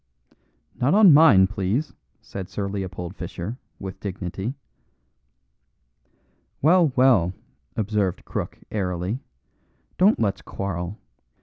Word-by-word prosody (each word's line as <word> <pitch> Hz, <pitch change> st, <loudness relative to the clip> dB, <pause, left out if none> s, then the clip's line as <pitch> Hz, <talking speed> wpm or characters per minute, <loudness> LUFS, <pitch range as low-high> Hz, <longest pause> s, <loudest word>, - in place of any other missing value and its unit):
"Not 140 Hz, +8 st, +1 dB
on 205 Hz, -6 st, +8 dB
mine, 140 Hz, -11 st, +7 dB
please," 105 Hz, +8 st, -2 dB, 0.3 s
said 95 Hz, -1 st, -7 dB
Sir 100 Hz, 0 st, -3 dB
Leopold 95 Hz, -2 st, -5 dB
Fischer, 105 Hz, +9 st, -6 dB, 0.2 s
with 95 Hz, -1 st, -7 dB
dignity. 95 Hz, +4 st, -4 dB, 2.0 s
"Well, 165 Hz, 0 st, +4 dB
well," 120 Hz, -10 st, +4 dB, 0.4 s
observed 105 Hz, -3 st, -1 dB
Crook, -, -, -4 dB
airily, 95 Hz, +2 st, -2 dB, 0.8 s
"don't 200 Hz, +4 st, +5 dB
let's 100 Hz, -3 st, 0 dB
quarrel. 95 Hz, 0 st, -4 dB
100 Hz, 95 wpm, -24 LUFS, 95-130 Hz, 2.0 s, on